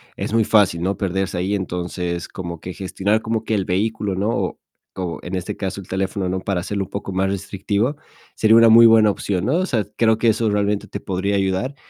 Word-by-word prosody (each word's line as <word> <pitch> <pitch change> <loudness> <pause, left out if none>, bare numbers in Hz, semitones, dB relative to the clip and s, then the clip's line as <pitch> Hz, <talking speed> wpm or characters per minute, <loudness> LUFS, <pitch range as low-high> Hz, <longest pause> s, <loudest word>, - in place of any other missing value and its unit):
es - - -4
muy 115 -1 +3
fácil, 100 -6 +3
¿no?, 95 +2 -1
perderse 95 -1 -2
ahí, 95 +3 0
entonces 90 -2 -3
como 85 -3 -6
que 90 - -6
gestionar 100 +3 -1
como 110 0 -2
que 110 - -2
el 95 -2 0
vehículo, 105 +1 -1
¿no?, 100 +4 -1
o - - -2 0.4
o 90 -3 -4
en 90 +1 -4
este 90 -1 -4
caso 95 0 -4
el - - -15
teléfono, 95 0 -2
¿no?, 95 +1 -1
para 95 -1 -2
hacerlo 100 +2 -3
un - - -18
poco 100 -1 -5
más 95 +1 0
restrictivo 100 +6 -2 0.4
sería 110 0 +5
una 115 0 +7
muy 115 +1 +8
buena 110 -2 +6
opción, 95 -2 -2
¿no?, 140 +7 +2
o 185 - +1
sea, 115 - 0
creo 110 -1 +3
que 115 - +3
eso 110 0 +1
realmente 105 0 0
te - - -7
podría 100 +2 -1
ayudar 95 +8 -1
100 Hz, 220 wpm, -21 LUFS, 95-110 Hz, 0.4 s, muy